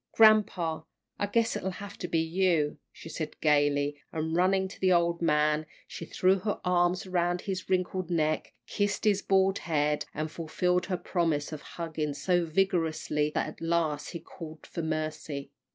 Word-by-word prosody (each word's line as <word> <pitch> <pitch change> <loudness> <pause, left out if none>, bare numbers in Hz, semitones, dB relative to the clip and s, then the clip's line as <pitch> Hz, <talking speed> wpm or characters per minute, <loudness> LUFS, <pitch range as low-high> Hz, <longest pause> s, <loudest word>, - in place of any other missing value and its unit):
"Grampa, 205 -7 +4 0.4
I 205 - 0
guess 225 +2 +1
it'll 190 - -2
have 200 0 -8
to 180 - -3
be 165 - 0
you," 165 -3 +1
she - - -12
said, 155 -1 -5
gaily, 145 -1 +2
and, 160 0 -2
running 190 +2 +3
to 190 - -12
the 185 -1 +4
old 170 -1 +2
man, 150 -1 +2 0.2
she 165 - -7
threw 190 +1 +3
her 205 +2 -2
arms 180 +1 +2
around 175 -1 0
his 185 -2 -4
wrinkled 185 -1 0
neck, 155 -2 0
kissed 205 +1 -1
his 200 -2 +3
bald 195 0 +3
head, 150 -2 0
and 155 +1 -3
fulfilled 180 +2 0
her 185 -1 -1
promise 165 -6 -1
of 155 -2 -6
a - - -17
hugging 155 -3 -4
so 175 +4 +1
vigorously 160 -4 +1
that - - +1
at 155 - -10
last 165 -3 0
he 170 - -6
called 160 -2 -10
for 170 - -5
mercy. 155 -3 -3
170 Hz, 170 wpm, -29 LUFS, 155-185 Hz, 0.4 s, Grampa